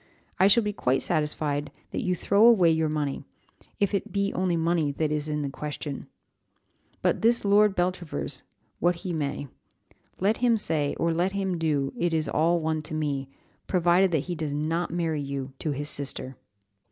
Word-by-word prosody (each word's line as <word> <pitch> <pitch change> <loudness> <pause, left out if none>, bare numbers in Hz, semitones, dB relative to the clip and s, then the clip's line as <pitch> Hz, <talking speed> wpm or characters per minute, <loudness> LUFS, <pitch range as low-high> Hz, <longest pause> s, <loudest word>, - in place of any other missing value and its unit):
I 190 - +6
shall 225 +3 +5
be 210 0 -2
quite 130 -8 +1
satisfied 150 -1 -1 0.2
that - - -2
you 180 -1 0
throw 200 +4 +2
away 190 -8 +6
your 160 -1 +1
money, 150 -2 -2 0.6
if 200 0 +1
it 200 +1 -2
be 200 +1 0
only 180 -2 0
money 165 -2 +1
that 155 +1 -1
is 150 0 -1
in 150 -1 -1
the 140 - -2
question; 145 -1 -6 1.0
be - - +4
this 230 0 +2
Lord 205 0 +4
Beltravers 175 -2 -2 0.4
what 175 +1 +2
he 180 - -2
may. 145 -2 -3 0.7
Let 205 +4 +2
him 240 -2 +3
say, 155 -8 +1
'or 165 0 0
let 180 +4 0
them 190 -3 -1
do, 145 -4 0
it 170 -1 0
is 155 -2 0
all 170 +3 +2
one 160 -1 -1
to 155 - -7
me,' 140 -3 -2 0.4
provided 180 +1 +3
that 160 -5 +1
he 180 - -3
does 155 -3 -3
not 160 +4 -1
marry 165 -3 -1
you 140 -1 -5
to 155 - -2
his 145 0 -2
sister." 135 -2 -3
160 Hz, 180 wpm, -26 LUFS, 150-185 Hz, 1.0 s, I